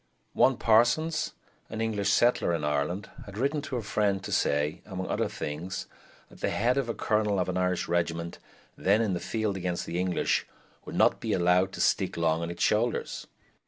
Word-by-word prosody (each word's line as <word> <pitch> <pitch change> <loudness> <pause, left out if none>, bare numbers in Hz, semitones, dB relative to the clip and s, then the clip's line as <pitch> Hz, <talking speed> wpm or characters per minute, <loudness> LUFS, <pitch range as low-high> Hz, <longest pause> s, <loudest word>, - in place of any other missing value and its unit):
One - - +4
Parsons, 120 +8 +3 0.4
an 110 - -5
English 105 -3 0
settler 120 -7 +3
in 80 - -4
Ireland, 75 +7 -1 0.2
had 100 0 -9
written 140 +5 0
to 140 -3 -5
a 115 - -3
friend 100 -2 0
to - - -6
say, 75 +2 +1
among 95 -2 -5
other - - 0
things, 80 +6 -5 0.4
that - - -16
the - - +1
head 120 +4 +1
of 125 -4 -2
a 115 - -2
colonel 105 -2 +1
of 90 - 0
an 90 - -2
Irish 90 -1 0
regiment 85 0 -1 0.4
then 105 +4 +3
in 105 -4 0
the 90 - -1
field 110 -1 -2
against 90 -2 -2
the 85 - -3
English 90 -1 0 0.4
would - - -7
not - - +4
be - - -2
allowed 90 +2 +3
to - - -4
stick - - +1
long 80 -1 +1
on 85 - -3
its 85 - -3
shoulders. 115 +3 0
95 Hz, 195 wpm, -28 LUFS, 85-110 Hz, 0.4 s, One